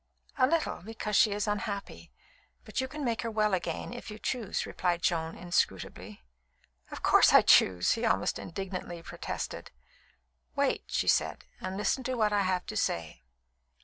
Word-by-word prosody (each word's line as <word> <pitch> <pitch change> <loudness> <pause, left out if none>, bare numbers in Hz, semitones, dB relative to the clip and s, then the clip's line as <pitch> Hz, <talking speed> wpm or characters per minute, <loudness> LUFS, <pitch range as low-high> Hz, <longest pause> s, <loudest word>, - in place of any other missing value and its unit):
"A 255 - +6
little, 330 +3 0
because 215 +1 -4
she 215 - +5
is 205 +1 -1
unhappy; 205 -1 -4 0.5
but - - -2
you 260 - -2
can 295 +1 -5
make 230 -2 0
her 230 - -3
well 215 -2 +1
again 185 +5 -2
if 240 - -8
you 210 - -7
choose," 225 -2 -2
replied 175 -2 -1
Joan 165 -1 0
inscrutably. 175 - -2 0.7
"Of - - -8
course - - +6
I - - +8
choose!" 90 -1 +5
he 230 - 0
almost 230 - +1
indignantly 180 -1 -6
protested. - - -5 0.9
"Wait," - - +1
said - - +1
she, - - -33
"and 185 +1 -3
listen 235 +5 0
to 255 - -1
what 215 -3 +2
I 205 - +3
have 185 -1 0
to 215 - -6
say. 85 - -2
205 Hz, 165 wpm, -30 LUFS, 180-225 Hz, 0.9 s, I